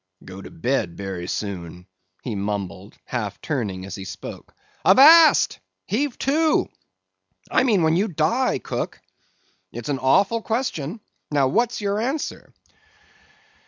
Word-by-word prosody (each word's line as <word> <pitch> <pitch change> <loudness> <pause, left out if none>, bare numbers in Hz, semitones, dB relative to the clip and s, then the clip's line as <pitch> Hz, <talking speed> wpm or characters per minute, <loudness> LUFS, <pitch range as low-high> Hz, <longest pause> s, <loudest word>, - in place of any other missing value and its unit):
"Go 95 +1 -9
to - - -10
bed 130 - -2
berry 95 -3 -5
soon," 90 -4 -5 0.4
he 120 - -4
mumbled, 100 -1 -5
half 105 -5 -4
turning 105 - -3
as 95 - -8
he 95 - -6
spoke. 95 -1 -9 0.3
"Avast! 310 - +7 0.3
heave 260 +4 -1
to! 310 +3 +2 0.8
I - - +4
mean 220 -9 +2
when 160 0 +3
you 195 +5 +2
die, 175 - +1
cook. - - -5 0.7
It's - - -7
an 140 -2 -1
awful 195 - +3
question. 220 - -3 0.3
Now 140 -3 +2
what's 235 - 0
your 200 0 -1
answer?" 270 +7 -3
145 Hz, 125 wpm, -23 LUFS, -, 0.8 s, Avast